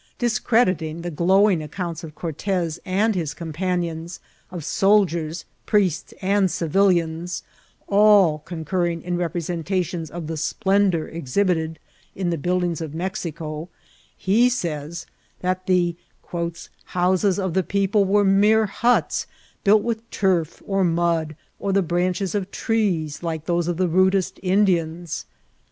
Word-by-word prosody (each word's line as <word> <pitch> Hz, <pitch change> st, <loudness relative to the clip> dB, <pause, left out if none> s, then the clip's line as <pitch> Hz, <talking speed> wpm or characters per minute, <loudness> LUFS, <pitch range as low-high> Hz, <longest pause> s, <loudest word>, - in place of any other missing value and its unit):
'' -, -, -44 dB
Discrediting 185 Hz, -, +1 dB
the 175 Hz, -, -3 dB
glow 190 Hz, +6 st, +4 dB
ing 180 Hz, -6 st, +1 dB
accounts 170 Hz, +2 st, -5 dB
of 155 Hz, -2 st, -9 dB
Cortez 170 Hz, 0 st, -2 dB
and 200 Hz, +4 st, +2 dB
his 160 Hz, -6 st, -3 dB
companions, 170 Hz, +1 st, -3 dB, 0.3 s
of 175 Hz, -5 st, -7 dB
soldiers, 170 Hz, -6 st, +2 dB, 0.2 s
priests, 190 Hz, -6 st, +1 dB
and 195 Hz, 0 st, +3 dB
civilians, 170 Hz, -1 st, +1 dB, 0.4 s
all 200 Hz, -6 st, +5 dB
concurring 170 Hz, +1 st, -2 dB
in 180 Hz, 0 st, -2 dB
representations 175 Hz, 0 st, -2 dB
of 170 Hz, -1 st, -6 dB
the 160 Hz, +1 st, -4 dB
splendour 190 Hz, +1 st, +1 dB
exhibited 160 Hz, +1 st, -1 dB, 0.4 s
in 185 Hz, -2 st, -1 dB
the 170 Hz, -, -1 dB
buildings 175 Hz, 0 st, 0 dB
of 160 Hz, -1 st, -5 dB
Mexico, 165 Hz, -3 st, -4 dB, 0.5 s
he 225 Hz, +6 st, +3 dB
says 170 Hz, -7 st, -3 dB, 0.4 s
that 185 Hz, 0 st, -2 dB
the 175 Hz, -2 st, +2 dB, 0.4 s
^^ 170 Hz, -1 st, -4 dB, 0.2 s
houses 185 Hz, +1 st, +1 dB
of 190 Hz, -4 st, -1 dB
the 190 Hz, -, +3 dB
people 200 Hz, +2 st, +1 dB
were 200 Hz, +1 st, +3 dB
mere 210 Hz, +3 st, +4 dB
huts, 235 Hz, +4 st, +1 dB, 0.4 s
built 210 Hz, +1 st, +5 dB
with 230 Hz, -1 st, -3 dB
turf, 180 Hz, -5 st, 0 dB
or 195 Hz, -1 st, +1 dB
mud, 165 Hz, -2 st, +1 dB, 0.2 s
or 200 Hz, -, -1 dB
the 195 Hz, 0 st, +3 dB
branches 180 Hz, +2 st, -1 dB
of 200 Hz, -2 st, -2 dB
trees, 185 Hz, -11 st, -1 dB
like 160 Hz, -2 st, -3 dB
those 170 Hz, 0 st, 0 dB
of 175 Hz, -2 st, -1 dB
the 185 Hz, 0 st, +2 dB
rudest 185 Hz, +2 st, +2 dB
Indians." 175 Hz, -4 st, 0 dB
180 Hz, 135 wpm, -23 LUFS, 165-195 Hz, 0.5 s, all